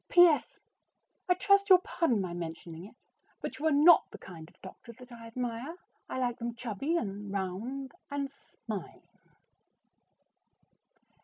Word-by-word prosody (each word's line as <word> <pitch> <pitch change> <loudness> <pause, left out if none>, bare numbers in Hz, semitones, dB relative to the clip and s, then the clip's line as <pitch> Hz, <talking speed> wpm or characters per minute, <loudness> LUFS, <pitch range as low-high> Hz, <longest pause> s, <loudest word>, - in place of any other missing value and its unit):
P.S. 350 -4 +5 0.7
I 360 - +5
trust 400 +2 +3
you 375 - +11
will 365 - +2
pardon 250 - +1
my 180 -2 -4
mentioning 165 0 -7
it, 210 - -14 0.4
but - - -6
you 315 - +1
are - - +3
not 305 +4 +6
the - - -10
kind 165 -3 -11
of - - -27
doctor 190 +5 -11
that 250 +2 -15
I 230 -1 -10
admire. 245 +5 -4 0.3
I - - -4
like 245 -1 -1
them 235 0 -4
chubby 245 - -2
and 205 -6 -4
round 210 +8 -4 0.2
and 285 -1 -2
smiling. 225 -7 -9
240 Hz, 150 wpm, -31 LUFS, 200-285 Hz, 0.7 s, you